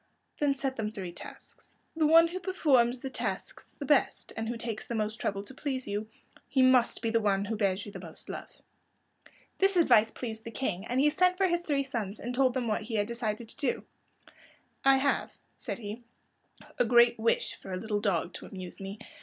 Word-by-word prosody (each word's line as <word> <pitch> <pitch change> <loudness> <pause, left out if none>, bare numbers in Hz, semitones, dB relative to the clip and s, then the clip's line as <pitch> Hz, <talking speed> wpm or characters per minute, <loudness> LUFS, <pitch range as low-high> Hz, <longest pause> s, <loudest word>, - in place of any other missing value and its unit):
"Then 285 -2 +2
set 270 -1 -2
them 215 -2 -1
three 195 -5 -6
tasks. 170 - -12 0.2
The 315 -2 +3
one 330 +2 +7
who 365 +2 -4
performs 260 -10 +2
the 265 - -5
tasks 200 -7 -5
the - - -5
best, - - +2
and 225 0 -3
who 240 - -3
takes 225 -2 -5
the 235 - -3
most 215 0 -1
trouble 200 0 -1
to 235 - -10
please 265 -2 -3
you,—he 220 +5 -2
must 255 -2 +4
be 225 - +1
the 230 - +3
one 200 -1 +1
who 220 +2 -2
bears 200 -2 0
you 205 - -8
the - - -8
most - - -10
love." - - -6 1.1
This 390 -1 +3
advice 235 -10 +6
pleased 220 -2 -6
the 230 - -6
King, 210 -6 -3
and 250 +2 0
he 295 +2 +4
sent 365 +3 +3
for 385 - +3
his 345 -1 +1
three 285 -5 0
sons, 225 -6 -4
and 245 +2 -4
told 260 0 +3
them 250 -2 -1
what 215 - 0
he 220 +1 -5
had 205 -1 +2
decided 230 -1 -3
to - - -10
do. 275 -4 -1 1.0
"I 270 0 +6
have," 280 +1 0 0.2
said - - -5
he, 215 0 -7 0.8
"a - - +6
great 235 0 +5
wish 230 +1 +1
for 190 - -10
a 185 - -2
little 210 +1 -2
dog 180 -4 0
to - - -8
amuse 185 0 -8
me. 195 +2 -6
235 Hz, 210 wpm, -30 LUFS, 210-270 Hz, 1.1 s, one